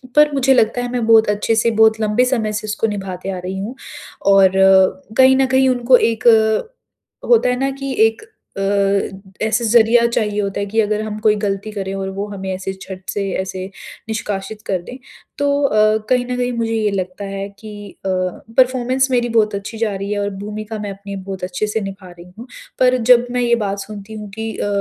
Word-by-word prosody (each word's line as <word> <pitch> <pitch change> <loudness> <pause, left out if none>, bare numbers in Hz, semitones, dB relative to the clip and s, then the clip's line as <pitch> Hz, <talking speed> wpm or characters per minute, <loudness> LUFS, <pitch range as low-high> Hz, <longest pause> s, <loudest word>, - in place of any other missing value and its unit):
पर 300 0 +6
मुझे 270 -1 +3
लगता 245 0 +2
है 245 - -3
मैं 245 -2 -1
बहुत 225 -1 +6
अच्छे 210 +2 0
से 230 +1 +2
बहुत 220 0 +4
लंबे 215 +4 +2
समय 235 -4 0
से 210 0 -4
इसको 215 +1 -1
निभाते 195 -3 -5
आ 185 - -4
रही 185 +1 -4
हूँ 215 +7 -5 0.6
और 195 -1 +6 0.7
कहीं 260 0 +6
न 270 - +3
कहीं 260 0 +3
उनको 250 0 +4
एक 230 0 0
अ, 225 - 0
होता 465 - +4
है 250 - +1
ना? 270 +1 0
कि 275 0 -5
एक 225 - -6 0.4
अ, 195 0 -1
ऐसा 230 +2 0
ज़रिया 235 +1 +4
चाहिए 210 -3 -1
होता 200 0 -3
है 200 - -1
कि 215 +3 -2
अगर 210 0 -1
हम 215 -1 -5
कोई 215 -1 +3
गलती 205 0 -3
करें 195 -2 -4
और 195 0 -3
वो 200 +2 -4
हमें 195 -2 -6
ऐसे 190 +1 -4
छट 190 -1 -10
से 200 -1 -2
ऐसे 185 0 -5 0.4
निष्कासित 210 -1 -4
कर 185 -3 -1
दें। 250 +8 -10 0.4
तो 285 0 +1
अ, 215 -4 +3
कहीं 250 -1 +2
न 250 0 -3
कहीं 250 0 -1
मुझे 225 -1 -1
ये 215 -2 0
लगता 185 0 -4
है 195 0 -5
कि 205 -2 -9 0.2
अ, - - 0 0.5
परफ़ॉर्मेंस 255 +1 +2
मेरी 240 -1 +1
बहुत 215 -2 +2
अच्छी 200 +3 -6
जा 220 -3 -1
रही 195 +1 -5
है 205 - -1
और 200 0 -1 0.2
भूमिका 215 +1 -6
मैं 205 -1 -4
अपनी 200 0 -8
बहुत 190 -1 -7
अच्छे 180 +3 -2
से 215 +1 -2
निभा 195 -1 -8
रही 175 +1 -14
हूँ। 240 - -9 0.3
पर 255 0 +4
जब 245 0 +6
मैं 250 - 0
ये 235 -1 +3
बात 200 0 -3
सुनती 205 +1 -9
हूँ 210 -1 -8
कि 225 0 -3
अ, - - -2
215 Hz, 215 wpm, -18 LUFS, 195-240 Hz, 0.7 s, पर